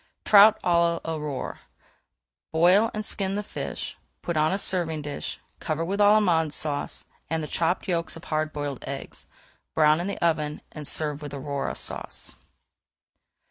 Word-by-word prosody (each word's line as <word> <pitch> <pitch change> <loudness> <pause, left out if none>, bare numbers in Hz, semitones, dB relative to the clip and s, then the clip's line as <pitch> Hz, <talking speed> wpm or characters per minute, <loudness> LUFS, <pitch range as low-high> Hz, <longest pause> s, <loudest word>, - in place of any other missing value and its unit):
TROUT 210 +1 +8
À 170 -1 +3
L'AURORE 150 -4 -4 0.9
Boil 180 +7 +5
and 215 0 -2
skin 195 -2 -2
the 210 - -2
fish, - - -5 0.3
put 170 - -2
on 155 0 +3
a 190 - +1
serving 165 -6 +1
dish, 145 -1 -5 0.2
cover 160 +1 -2
with 195 +4 -2
Allemande 195 -7 +4
Sauce, 145 -1 -3 0.2
and 160 0 -1
the - - -4
chopped 170 +5 0
yolks 170 -3 -1
of 165 - -11
hard 155 0 -1
boiled 145 -3 -4
eggs. 135 0 -7 0.5
Brown 155 0 +5
in 180 - -3
the 200 - -3
oven 155 -3 0
and 150 -2 -7
serve 150 -2 0
with 145 -1 -6
Aurora 140 0 -3
Sauce. - - -5
160 Hz, 150 wpm, -26 LUFS, 150-180 Hz, 0.9 s, TROUT